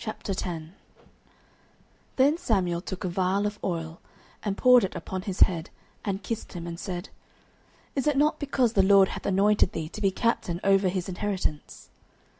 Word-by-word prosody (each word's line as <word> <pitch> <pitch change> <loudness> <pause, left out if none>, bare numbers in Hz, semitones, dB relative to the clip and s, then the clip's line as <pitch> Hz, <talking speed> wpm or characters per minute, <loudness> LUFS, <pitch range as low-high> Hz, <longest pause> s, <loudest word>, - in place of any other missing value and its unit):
09:010:001 180 -7 -4 1.4
Then 275 +4 +4
Samuel 190 - 0
took 190 0 -6
a - - -1
vial 185 +3 0
of 210 0 -3
oil, 165 -2 -3 0.4
and 200 -2 -2
poured 250 -1 +6
it 190 - -3
upon 190 -1 -5
his 190 -1 -5
head, 170 -2 +3 0.3
and 200 -1 -3
kissed 230 +3 -5
him, 170 -2 -6
and 170 0 -6
said, 180 +1 -5 0.9
Is 275 +1 -1
it 295 -2 +2
not 300 +2 +2
because 260 -5 +1
the 195 - +4
LORD 195 0 +6
hath - - -5
anointed 200 0 +3
thee 160 -1 -4
to 215 - -8
be 195 - +3
captain 190 -4 -1
over 195 -1 +4
his 185 0 -3
inheritance? 185 -5 -4
195 Hz, 165 wpm, -27 LUFS, 180-215 Hz, 1.4 s, poured